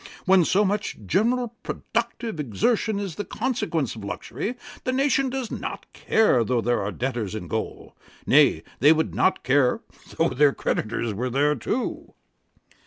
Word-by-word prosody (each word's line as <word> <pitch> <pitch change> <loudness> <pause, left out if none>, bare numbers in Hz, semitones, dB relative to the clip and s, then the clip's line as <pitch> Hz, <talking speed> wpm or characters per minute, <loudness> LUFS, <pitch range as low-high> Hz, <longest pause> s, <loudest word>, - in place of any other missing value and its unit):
When 190 -2 +5
so 200 +6 +3
much 205 +2 -1
general 235 - +1
productive 230 -4 -3
exertion 200 - 0
is 195 -5 -4
the 205 - -2
consequence 210 - -2
of 110 - -9
luxury, 140 - -4 0.3
the 255 - 0
nation 275 0 +2
does 255 -3 -4
not - - -5
care 210 - +3
though 125 +2 0
there 120 +1 +1
are 100 +1 -2
debtors 120 -4 -3
in 90 -5 -6
gaol; - - -5 0.3
nay, - - +4 0.2
they 145 +5 +7
would 160 0 -1
not 190 - +1
care 130 -1 +3 0.4
though - - +3
their 145 +1 +3
creditors 115 0 -2
were 125 +6 -2
there 145 +4 +2
too.' 215 - -3
160 Hz, 155 wpm, -24 LUFS, -, 0.4 s, they